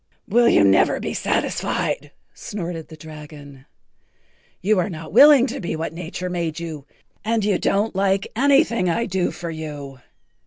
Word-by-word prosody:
"Will 235 +3 +4
you - - +5
never 95 -1 +4
be - - -4
satisfied?" - - -1 0.2
snorted 170 -5 -6
the 160 - -12
dragon. 150 -3 -12 0.9
"You 205 +1 +2
are 195 - 0
not 160 -2 -8
willing 275 +1 +8
to 250 - -5
be 175 - -3
what 160 0 -4
nature 180 +2 -6
made 170 -3 -3
you 155 -4 -7 0.4
and 220 -1 0
you 205 -3 +1
don't 205 +1 0
like 195 0 +1
anything 275 - +3
I 230 +7 0
do 185 -3 -1
for 170 -1 -6
you. 145 -4 -7
175 Hz, 155 wpm, -22 LUFS, 155-210 Hz, 0.9 s, willing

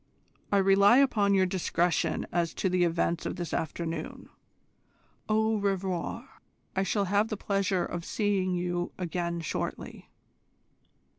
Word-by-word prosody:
I 200 - +4
rely 195 +4 +6
upon 210 -7 +3
your 190 -1 +4
discretion 180 -2 0
as 170 -1 -1
to 190 - 0
the 180 0 +2
events 170 0 0
of - - -4
this 175 -1 -5
afternoon. 165 +1 -4 1.0
Au 220 0 +2
revoir. 195 +4 -2 0.5
I 190 - +2
shall 200 +1 0
have 205 +3 +2
the 215 - -4
pleasure 195 -2 0
of 175 -1 -5
seeing 195 -2 0
you 175 0 -2
again 170 -1 -3
shortly." 160 - -5
185 Hz, 130 wpm, -29 LUFS, 175-200 Hz, 1.0 s, rely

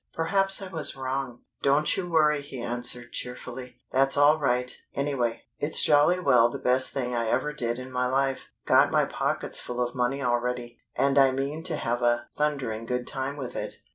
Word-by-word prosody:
Perhaps 195 +4 +1
I - - -4
was 155 -6 0
wrong." 130 -2 -4 0.2
"Don't 140 +2 +2
you 180 -2 -3
worry," 150 -3 +3
he 140 -2 -8
answered, 120 0 -3
cheerfully. 125 0 -7
"That's 135 +1 +2
all 145 +2 +5
right, 125 -3 0 0.2
anyway. 135 -5 -1 0.2
It's 150 +2 +2
jolly 150 +5 +4
well 125 -8 +4
the - - -5
best 130 +1 +2
thing 125 -2 -2
I 115 -1 0
ever 150 +6 0
did 120 -4 -2
in 130 0 -8
my 125 0 0
life. 135 +1 -1 0.2
Got - - +5
my - - +3
pockets - - -2
full 125 0 -5
of 120 0 -1
money 130 +3 -1
already, 120 -1 -2 0.2
and 140 0 +3
I 135 -1 +6
mean 135 +4 -3
to - - -1
have 120 +1 -2
a 120 0 +1
thundering 130 -7 -2
good 125 0 -2
time 135 +2 -4
with 130 -4 -6
it. - - -4
130 Hz, 190 wpm, -27 LUFS, 125-145 Hz, 0.2 s, I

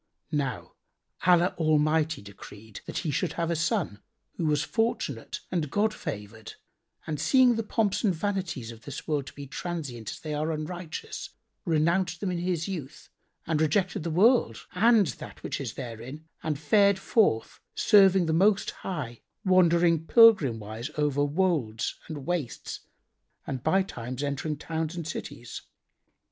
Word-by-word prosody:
Now 140 -4 -2 0.5
Allah 180 0 +5
Almighty 155 -2 +2
decreed 100 +1 -11
that - - -4
he 155 - 0
should 140 - -1
have 170 0 -1
a - - +1
son, 165 - -1 0.3
who 165 - -1
was 150 -1 +2
fortunate 225 - -2
and 165 -5 -1
God 210 +7 +1
favoured 105 - -7 0.5
and 150 -2 -3
seeing 260 -2 +5
the 225 - 0
pomps 215 -1 0
and 210 - +4
vanities 180 - -3
of 115 -1 -12
this 140 - -7
world 145 -3 -1
to - - -9
be 140 - -8
transient 140 -6 -5
as - - -7
they 155 -1 -5
are 155 +2 -1
unrighteous, 160 +2 -5 0.4
renounced 170 +1 +1
them 190 0 -2
in 175 - -2
his 175 -2 -1
youth 155 -7 -7 0.4
and 160 -2 0
rejected 175 +4 +1
the 165 - -3
world 185 - +3
and 220 +2 +5
that - - -8
which - - -3
is 120 -5 -5
therein 130 +5 -7 0.2
and 155 -2 -2
fared 200 +6 +4
forth 190 - +1 0.2
serving 195 -3 +5
the 160 - 0
Most 195 +5 +3
High, 140 -11 -5 0.2
wandering 170 -3 +4
pilgrim 210 - +6
wise 110 +5 -6
over 145 -1 +1
words 145 -8 0
and 145 -4 -6
wastes 165 -8 -3 0.7
and 130 -3 -4
bytimes 140 -8 -1
entering 145 +2 -2
towns 160 +2 -3
and 170 -3 -5
cities. 120 -6 -6
160 Hz, 150 wpm, -27 LUFS, 140-185 Hz, 0.7 s, pilgrim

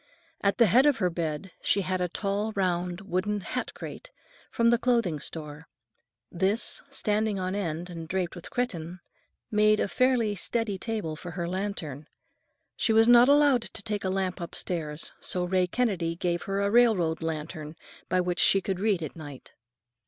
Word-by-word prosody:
At 200 0 +1
the 235 - +6
head 250 +8 +5
of 285 -5 +3
her 180 -5 +1
bed 165 +2 -3
she 200 - +2
had 185 0 -2
a 180 - 0
tall 205 +4 -2
round 180 -1 -1
wooden 200 +2 -1
hat - - -4
crate, - - -8 0.4
from 230 0 +3
the 235 - +3
clothing 230 -10 +1
store. 150 0 -7 0.6
This, 195 +6 +1
standing 215 -5 0
on 185 0 -2
end 175 -4 -3
and 165 -2 -7
draped 180 0 -2
with 175 - -9
cretonne, 180 -8 -3 0.5
made 215 0 +4
a - - +1
fairly 245 -1 +2
steady 205 0 -2
table 210 -9 -3
for 175 +3 -8
her 170 -1 -2
lantern. 175 -6 -4 0.7
She 225 - +1
was 225 +1 +5
not 240 +2 +7
allowed 285 -3 +5
to - - -6
take 210 -2 -3
a 190 - 0
lamp 190 -1 -2
upstairs, 165 -2 -4
so 180 - 0
Ray 180 0 +1
Kennedy 180 -7 0
gave 175 0 -1
her 195 0 -1
a 200 0 +1
railroad 205 -10 +3
lantern 155 -1 -5 0.3
by 185 0 +2
which 180 -1 -2
she 195 - +6
could 190 -1 -3
read 200 -4 +1
at 155 - -6
night. 145 -5 -10
190 Hz, 175 wpm, -27 LUFS, 170-215 Hz, 0.7 s, not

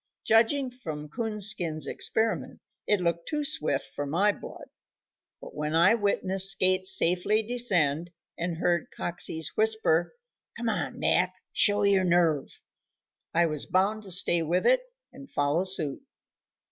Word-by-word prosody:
Judging 250 +4 +3
from 155 -12 -7
Coonskin's 200 - 0
experiment, 220 +9 -1 0.3
it 210 - +2
looked 170 -1 -1
too 300 -1 -2
swift 150 - +1
for 145 - -4
my 190 +8 +2
blood. - - -10 0.7
But - - -11
when 150 +1 -3
I 170 +6 +5
witnessed 195 -3 0
Skates 185 0 +3
safely 185 +6 +1
descend 175 -10 0 0.3
and 170 -1 -3
heard 175 -1 0
Coxey's 160 -2 -3
whisper, 220 - +1 0.4
"Come 235 0 -2
on, 150 -11 -3
Mac, 185 +1 +1 0.2
show 205 0 +2
your 200 -2 +3
nerve," 170 -5 +1 0.7
I 170 +1 +4
was 155 -3 -3
bound 200 +4 +1
to 200 - -11
stay 175 -1 +3
with 170 +3 0
it - - +4 0.3
and 275 +1 -13
follow 145 +5 0
suit. 160 -7 -3
185 Hz, 135 wpm, -27 LUFS, 165-215 Hz, 0.7 s, I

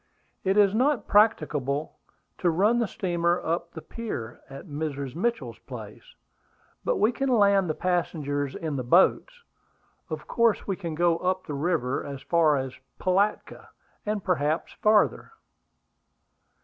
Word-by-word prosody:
"It 190 +1 +1
is 205 -2 +5
not 255 0 +1
practicable 150 - +1 0.4
to 175 - +2
run 205 +8 +3
the 230 - +1
steamer 175 -2 0
up 170 +1 -2
to - - -33
the 160 - -6
pier 125 - -6
at 135 0 -9
Mrs. 145 -4 -4
Mitchell's 235 +6 -2
place; - - -11 0.7
but - - 0
we 220 - +3
can 270 +3 -2
land 200 -6 +4
the 155 - -1
passengers 145 -6 -1
in 155 -4 -3
the 130 - -2
boats. 190 - +3 0.7
Of - - -5
course 230 -2 +1
we 195 - -1
can 170 -4 -5
go 170 0 +2
up 185 0 -1
the 150 - -5
river 145 -3 -1
as 140 -1 -7
far 160 -4 +3
as 130 -1 -4 0.3
Pilatka, 195 +3 0 0.3
and 210 -2 -2
perhaps 155 -3 0
farther." 215 - +2
175 Hz, 145 wpm, -26 LUFS, 150-210 Hz, 0.7 s, is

